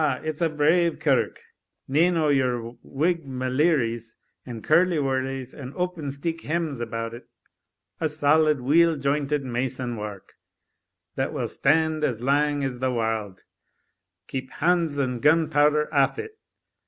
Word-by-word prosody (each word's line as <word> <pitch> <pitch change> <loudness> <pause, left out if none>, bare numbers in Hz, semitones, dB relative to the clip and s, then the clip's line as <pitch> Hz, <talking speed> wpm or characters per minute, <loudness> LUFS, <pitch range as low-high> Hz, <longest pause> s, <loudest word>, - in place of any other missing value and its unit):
it's 155 +1 -4
a 165 - +3
brave 160 +3 +2
kirk - - +1 0.5
nane 165 +6 +3
o' 155 -2 +2
yere 125 -4 0
whig 165 +4 -1
maleeries 130 -3 0 0.3
and 115 -3 -7
curliewurlies 135 -6 +1
and 135 -1 -9
opensteek 165 -2 -3
hems 155 -4 -2
about 115 0 -4
it 120 - -11 0.7
a' 160 - 0
solid, 150 -1 +3
weel 165 +5 +4
jointed 140 0 -1
mason 125 0 -3
wark, 105 -3 -7 0.8
that - - -2
will - - -2
stand 160 +2 +1
as 120 -5 -1
lang 145 +1 +1
as 130 -2 -3
the 130 0 0
warld, 110 -5 -2 0.8
keep 130 -1 -5
hands 165 -3 +1
and 125 -4 -1
gunpowther 150 -1 +3
aff 140 -2 +3
it. 440 0 -7
145 Hz, 130 wpm, -25 LUFS, 125-160 Hz, 0.8 s, weel